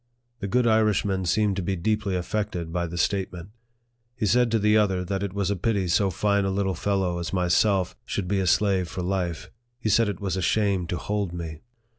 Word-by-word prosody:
The 100 - -3
good 125 +4 +2
Irishman 105 -4 +2
seemed 105 +3 +2
to - - 0
be 95 +2 -1
deeply 105 +2 -1
affected 90 -2 -3
by 85 0 -1
the 85 +1 -6
statement. 90 -1 -1 0.7
He 120 -4 -2
said 120 +4 +3
to 115 - +2
the 105 0 +3
other 95 -4 +2
that 95 +1 -2
it 100 -2 -2
was 100 0 -1
a - - +1
pity 100 0 0
so 95 +3 +2
fine 100 +2 +1
a 95 - 0
little 95 0 0
fellow 90 -1 -1
as 85 +1 -4
myself 90 +1 +2
should 100 -5 -3
be 100 +1 +1
a 95 - 0
slave 95 0 +2
for 90 0 -4
life. 90 -1 -2 0.3
He 110 - -1
said 115 +1 +3
it 100 - -4
was 95 -3 -2
a 95 - -2
shame 95 -1 +1
to 90 - -2
hold 100 -3 -2
me. 80 -3 -6
95 Hz, 215 wpm, -25 LUFS, 90-105 Hz, 0.7 s, said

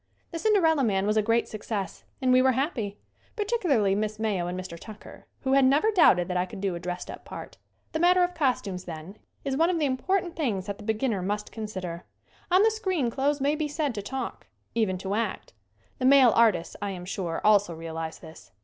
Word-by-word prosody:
"The 330 - -4
Cinderella 325 -7 +3
Man" 195 -4 +1
was 210 +1 +1
a 215 - +4
great 230 +2 +1
success 210 -2 -5 0.2
and 255 -1 +4
we 255 - +6
were 260 0 +4
happy; 245 -7 -2 0.4
particularly 360 - +1
Miss 210 +1 -1
Mayo 205 -5 -1
and 180 +1 -4
Mr. 185 -2 -7
Tucker, 215 +3 -12
who 265 -1 0
had 275 0 +5
never 285 +12 +4
doubted 180 - +5
that 180 - -1
I 180 +1 0
could - - -9
do 195 -1 -1
a 170 - -4
dressed 180 0 -5
up - - -10
part. - - -9 0.3
The 315 - -2
matter 360 +2 +5
of 355 0 0
costumes, 220 - -1
then, 170 +4 -8 0.3
is 270 -1 -1
one 330 +4 +3
of 360 - +1
the 310 - +1
important 345 +7 0
things 225 - -1
that 200 -1 -5
the - - -9
beginner 220 -1 0
must 205 +3 -3
con 220 -2 -5
sider. 180 -4 -6 0.4
On 370 +3 +5
the 445 - +5
screen 375 - -1
clothes 280 +3 0
may 280 +2 +2
be 305 0 -1
said 295 -2 -1
to 205 - -4
talk; 265 +6 -5 0.3
even 210 -5 +1
to 190 +2 -4
act. 225 +2 -3 0.5
The 255 - 0
male 265 -2 +7
artists, 215 -7 +3
I 205 - -2
am 180 -2 -6
sure, 180 -3 -3
also 205 -5 +4
realize 160 0 -5
this. 160 -1 -13
220 Hz, 215 wpm, -27 LUFS, 190-290 Hz, 0.5 s, male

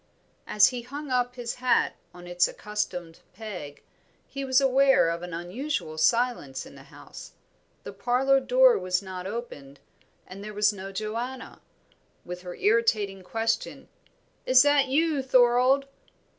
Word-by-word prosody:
As 210 -1 +5
he 250 -1 -5
hung 280 +3 -8
up 245 -1 0
his 240 -2 -4
hat 255 -1 +2 0.2
on 175 0 -13
its 175 0 +2
accustomed 180 -6 -5 0.2
peg, 180 -9 -8 0.4
he 275 - -6
was 260 0 +3
aware 270 -7 +4
of 170 0 -4
an 175 0 -7
unusual 175 - -4
silence 230 - 0
in - - -14
the - - -14
house. - - -13 0.5
The - - -8
parlour 250 +6 +2
door 260 -2 +4
was 185 +1 -1
not 185 -1 -7
opened, 145 - -8 0.5
and 195 +2 -10
there 210 0 -8
was 210 0 +3
no 195 0 -8
Joanna, 230 +6 -6 0.6
with 180 0 -7
her 180 -1 -8
irritating 210 -3 +1
question, 225 +4 -3 0.6
"Is 255 0 +7
that 290 -1 +3
you, 300 +1 +1
Thorold?" 255 +1 +3
230 Hz, 145 wpm, -26 LUFS, 185-255 Hz, 0.6 s, Is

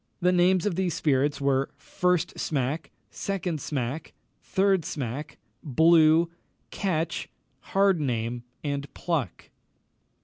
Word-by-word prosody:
The 180 -1 +3
names 180 0 +3
of 205 - +1
these 180 -2 -1
spirits 145 0 +1
were, 135 -1 +1
"First 180 -3 0
Smack," 145 +2 -1 0.2
"Second 180 -6 -3
Smack," 135 +1 -3 0.3
"Third 190 -2 +2
Smack," 145 +2 -5 0.3
"Blue," 160 +2 +5 0.4
"Catch," 170 -4 -2 0.4
"Hardname," 130 - +1 0.2
and 140 -1 -3
"Pluck." 155 - -3
160 Hz, 100 wpm, -27 LUFS, 140-180 Hz, 0.4 s, Blue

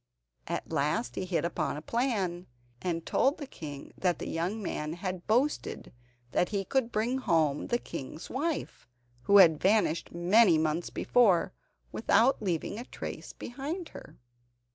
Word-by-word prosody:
At - - -4
last 140 -5 0
he 185 - -3
hit 180 -2 0
upon 170 -3 -2
a - - -6
plan, 200 -8 -1 0.3
and 165 -2 -2
told 275 +3 +2
the 290 - -6
king 145 - -9
that 180 -2 0
the - - -6
young 180 +7 -2
man 155 -6 -3
had 185 0 -5
boasted 255 +7 0 0.4
that 175 - +1
he 200 -2 -2
could 260 0 0
bring 240 +4 0
home 155 - +1
the 240 - +1
king's 160 - -7
wife, 300 - -3 0.4
who 200 - +6
had 165 -6 +7
vanished 190 -5 +2
many 175 +1 +5
months 155 +2 0
before, 195 -7 +3 0.4
without 230 +4 +3
leaving 185 +2 -2
a 240 - -6
trace - - -7
behind 295 +8 -6
her. - - -12
185 Hz, 150 wpm, -30 LUFS, 165-235 Hz, 0.4 s, had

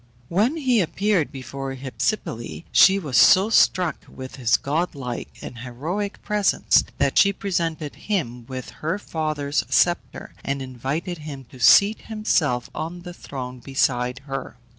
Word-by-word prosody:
When 220 - +1
he 255 -7 +2
appeared 190 -1 0
before 135 +1 -6
Hypsipyle, 120 - -3
she 195 0 +7
was 145 -10 -1
so 195 - +6
struck 180 -7 +3
with 130 0 -9
his 120 -3 +3
godlike 140 -5 -3
and 120 - -8
heroic 160 - -4
presence 210 -2 +3
that - - +2
she 200 - +6
presented 170 -6 -2 0.2
him 125 - -2
with 130 -1 -7
her 165 +5 -1
father's 155 -6 -2
sceptre, 175 -1 0
and 140 0 -2
invited 135 +7 -4
him 145 -3 -8
to 130 - -13
seat 200 - +6
himself 155 - 0
on 170 +3 -5
the 175 -1 -8
throne 130 -6 -7
beside 125 -1 0
her. 135 -3 -6
150 Hz, 140 wpm, -23 LUFS, 130-185 Hz, 0.2 s, she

